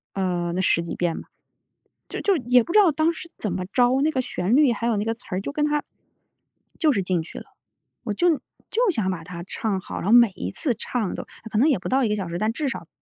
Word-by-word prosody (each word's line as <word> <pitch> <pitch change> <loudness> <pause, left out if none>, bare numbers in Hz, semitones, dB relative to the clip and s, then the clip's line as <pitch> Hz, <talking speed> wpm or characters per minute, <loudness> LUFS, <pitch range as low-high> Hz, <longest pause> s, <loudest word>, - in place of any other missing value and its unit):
呃 180 -3 -1
那 185 - -1
十 170 -2 +2
几 170 - -5
遍 175 -2 -1
吧。 - - -14 0.8
就 - - -5
就 400 -2 +3
是 315 - -2
也 245 0 +5
不 340 - -6
知 425 - +6
道 380 -6 +6
当 315 +3 +2
时 335 +1 -9
怎 210 - -2
么 180 +1 -3
着， 250 +1 +4
那 310 +2 +2
个 260 - 0
旋 210 -3 0
律 285 -3 +5
还 235 0 -3
有 235 -1 +2
那 205 - 0
个 225 +1 -1
词 230 - -9
儿， 185 +1 -1
就 - - -4
跟 295 +1 0
它 295 0 0 1.0
就 315 -3 +4
是 210 -8 +1
进 180 -2 0
去 - - -9
了。 - - -12 0.6
我 220 -4 -2
就 350 - +3 0.4
就 475 0 +2
想 215 - 0
把 180 -3 -3
它 170 +1 -8
唱 205 -3 -1
好， - - -7
然 - - -5
后 205 - +1
每 235 -3 +7
一 - - -4
次 280 -7 -1
唱 220 -1 -2
都 - - -5 0.3
可 - - -1
能 255 +8 +5
也 280 -10 +2
不 - - -5
到 265 +1 +2
1 230 - +1
个 210 - +1
小 190 -4 -4
时， 170 - -3
但 215 +4 0
至 290 +2 -1
少 - - -6
225 Hz, 285 characters per minute, -24 LUFS, 185-285 Hz, 1.0 s, 每